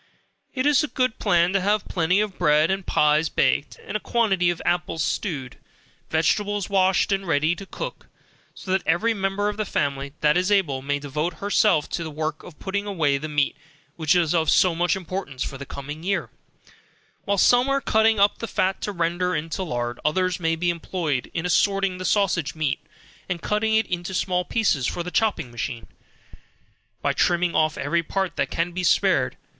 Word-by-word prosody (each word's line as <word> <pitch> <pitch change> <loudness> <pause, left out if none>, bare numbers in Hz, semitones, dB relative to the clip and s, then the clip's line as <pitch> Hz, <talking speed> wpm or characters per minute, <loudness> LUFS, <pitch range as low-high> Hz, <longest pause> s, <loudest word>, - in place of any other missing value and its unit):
It 255 0 0
is 295 0 +4
a - - -1
good 255 -5 -1
plan 175 +1 +2
to 195 - +2
have 205 +2 +1
plenty 180 +3 +2
of 210 -3 -4
bread 155 0 +3
and 195 0 -1
pies 150 +1 +3
baked, 140 - 0
and - - -6
a - - +1
quantity 195 -7 +1
of 175 - -2
apples 175 -2 0
stewed, 145 - -3 0.5
vegetables 205 +5 0
washed 190 0 +3
and 195 -1 -1
ready 155 +1 +2
to 195 +2 -10
cook, - - -7 0.5
so 185 - -7
that 190 0 +2
every 175 +9 +2
member 195 0 -1
of 210 0 -3
the 215 - 0
family, 140 -7 -2
that 150 +2 +4
is 185 +3 +1
able, 160 -10 +2
may 145 +1 -1
devote 150 +4 -3
herself 200 -3 +2
to 170 - -3
the 160 - -5
work 155 +1 -4
of 165 -4 -13
putting 200 +1 -3
away 150 -8 +1
the 155 +2 -5
meat 145 -1 +1 0.4
which 160 0 +2
is 170 -3 +2
of 160 -3 +2
so 180 -2 +4
much 175 +3 +1
importance 185 -8 -5
for 135 - -6
the 140 - -8
coming 145 +3 -7
year, 175 - -2 0.9
while 200 0 +1
some 245 +6 +4
are 275 0 +2
cutting 220 -4 +2
up 200 +1 +3
the 230 - -4
fat 190 -2 0
to 205 - -2
render 175 0 -1
into 160 +5 -3
lard, 120 -8 -3
others 185 +4 +1
may 165 -1 +1
be 175 +1 0
employed 165 -5 -3
in 165 - -3
assorting 195 0 +1
the 185 - -5
sausage 170 -8 +1
meat, 155 -4 -1 0.5
and 175 -2 -3
cutting 220 +1 +1
it 220 - +3
into 175 +1 -4
small 180 -1 0
pieces 180 - +1
for 175 - -3
the 180 - -6
chopping 210 - 0
machine, 120 0 -5 1.2
by - - +1
trimming 175 0 +1
off 155 0 +1
every 170 +4 0
part 190 +3 -2
that - - -1
can 170 +1 -1
be 180 +1 -4
spared. 170 - +2
175 Hz, 195 wpm, -24 LUFS, 155-195 Hz, 1.2 s, is